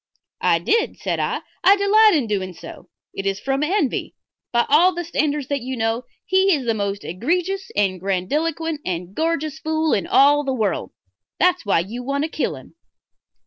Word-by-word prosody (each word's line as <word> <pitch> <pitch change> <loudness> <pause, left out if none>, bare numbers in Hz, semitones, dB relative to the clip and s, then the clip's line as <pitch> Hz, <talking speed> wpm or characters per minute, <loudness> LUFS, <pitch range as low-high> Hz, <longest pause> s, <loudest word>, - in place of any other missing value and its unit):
"I - - +3
did," 455 0 0
said - - -2
I. - - -1 0.2
"I 390 - +7
delight 420 0 +5
in 285 -6 +1
doing 190 -4 -2
so. - - -11 0.2
It 195 - -4
is 195 0 -1
from 270 +4 -1
envy. 305 -3 -1 0.4
By 235 -1 +2
all 345 +6 +4
the 345 - -3
standards 300 -4 -1
that 285 -2 -1
you 255 +1 -5
know 225 +2 -1 0.2
he 380 -1 +3
is 270 -4 -4
the 230 - +1
most 200 -1 -3
egregious 355 - -2
and 195 -3 +1
grandiloquent 295 - -2
and 180 +1 -4
gorgeous 315 +1 -1
fool 315 0 0
in 195 - 0
all 290 +2 +5
the 270 -2 -1
world. 215 -5 -1 0.5
That's 360 - +2
why 195 - +3
you 220 +8 -6
want 280 +3 -1
to 315 - -3
kill - - -2
him." - - -14
280 Hz, 185 wpm, -21 LUFS, 210-330 Hz, 0.5 s, I